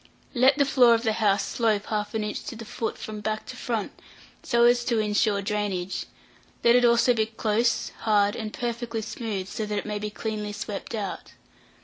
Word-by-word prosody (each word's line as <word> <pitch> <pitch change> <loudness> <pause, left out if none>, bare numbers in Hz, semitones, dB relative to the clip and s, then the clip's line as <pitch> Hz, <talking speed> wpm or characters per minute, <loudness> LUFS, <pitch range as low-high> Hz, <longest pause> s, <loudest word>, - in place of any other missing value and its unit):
Let 260 +2 +4
the 285 - +4
floor 250 -4 +6
of 230 - -2
the 220 -2 +1
house 205 -3 +2
slope 215 -3 0
half 210 0 -3
an 220 - 0
inch 210 - -4
to 285 - -6
the 230 0 -8
foot 225 0 -4
from 215 -1 -6
back 215 +1 -3
to - - -8
front, 225 -5 -3 0.5
so 235 0 +2
as 240 0 +5
to 235 - +1
insure 210 -1 +1
drainage; 195 -3 -2 0.6
let 235 0 +6
it 245 - +5
also 240 +1 +5
be 220 -2 +1
close, 225 +1 0
hard, 205 -2 +3
and 220 -2 -4
perfectly 235 -1 -3
smooth; 210 -4 -4
so 215 +1 -4
that 210 0 -2
it - - -3
may 210 -1 -3
be 210 0 -3
cleanly 210 -1 -4
swept 205 +2 -5
out. 205 -3 -5
220 Hz, 200 wpm, -26 LUFS, 210-235 Hz, 0.6 s, floor